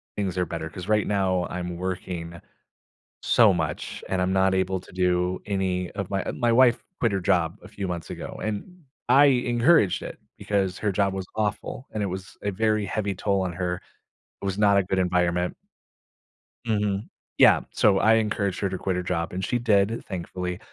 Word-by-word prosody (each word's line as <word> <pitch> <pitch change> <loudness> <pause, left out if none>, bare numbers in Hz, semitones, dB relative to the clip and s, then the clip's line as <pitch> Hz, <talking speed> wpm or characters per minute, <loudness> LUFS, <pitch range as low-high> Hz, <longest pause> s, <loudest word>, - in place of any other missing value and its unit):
things 95 -3 -2
are 90 - +1
better. 80 -1 -5
'Cause 90 +1 -8
right 105 -1 +2
now, 95 -3 +1
I'm 90 -1 -4
working 85 -2 -5 0.8
so 110 -5 +5
much, 80 -3 -3
and 95 -1 0
I'm 95 +1 +1
not 95 0 +3
able 95 0 0
to - - -16
do 90 0 +1
any 95 -3 -1
of 100 -2 -5
my 95 -1 -2
my 120 -2 +1
wife 120 0 +4 0.2
quit 115 -3 +2
her 100 - 0
job - - +1
a - - -10
few 100 -2 -5
months 85 -3 -5
ago, - - -7
and 150 - -5 0.3
I 140 +3 +7
encouraged 125 - +3
it - - -8 0.2
because 95 -3 -1
her 105 -2 0
job 100 -1 +1
was 95 -1 -4
awful, 110 +4 -3
and 105 - -3
it - - +1
was 95 0 -7
a 100 - 0
very 110 +1 +1
heavy 100 0 -2
toll 100 +1 0
on 90 -2 -2
her. 90 0 -2 0.7
It - - -5
was 95 +1 -2
not 100 -1 +4
a 100 - +4
good 95 +1 -2
environment. 90 -1 +1 1.1
Mhm, 105 -2 0 0.3
yeah, - - +7
so 100 -3 +3
I 110 0 +5
encouraged 105 -3 0
her 100 - +1
to 95 - -3
quit 95 0 -2
her 90 - -2
job, 90 -1 -2
and 95 +1 -3
she 120 - 0
did, 110 -1 +2
thankfully. 90 0 -4
95 Hz, 190 wpm, -25 LUFS, 90-105 Hz, 1.1 s, I